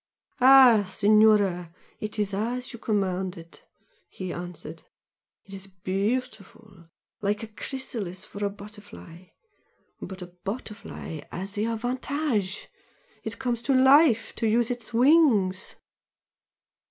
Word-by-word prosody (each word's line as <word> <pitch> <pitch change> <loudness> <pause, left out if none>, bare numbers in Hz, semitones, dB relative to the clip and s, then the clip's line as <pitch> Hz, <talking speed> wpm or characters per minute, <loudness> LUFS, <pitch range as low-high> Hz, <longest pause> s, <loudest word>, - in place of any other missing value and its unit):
"Ah, 255 -4 +8
Signora! 205 -4 +3 0.3
It 215 +1 -6
is 205 -1 -1
as 240 +6 -3
you 235 - -9
commanded!" 185 -5 -3 0.5
he 185 -2 -6
answered 175 0 -8 0.6
"It 195 - -12
is 195 0 -7
beautiful 200 -1 -4 0.3
like 210 +2 -1
a - - -5
chrysalis 215 -5 -5
for 205 - -7
a 200 - +1
butterfly. 200 -4 -12 0.8
But 185 0 -7
a 175 0 -13
butterfly 200 - -6
has 195 +3 -5
the 210 +1 -1
advantage 245 -2 -2 0.6
it 220 0 -5
comes 245 -3 -2
to 260 +3 +1
LIFE, 265 -2 +5
to 225 - 0
use 235 +2 +2
its 240 -2 -6
wings!" 235 - +3
210 Hz, 115 wpm, -26 LUFS, 190-240 Hz, 0.8 s, Ah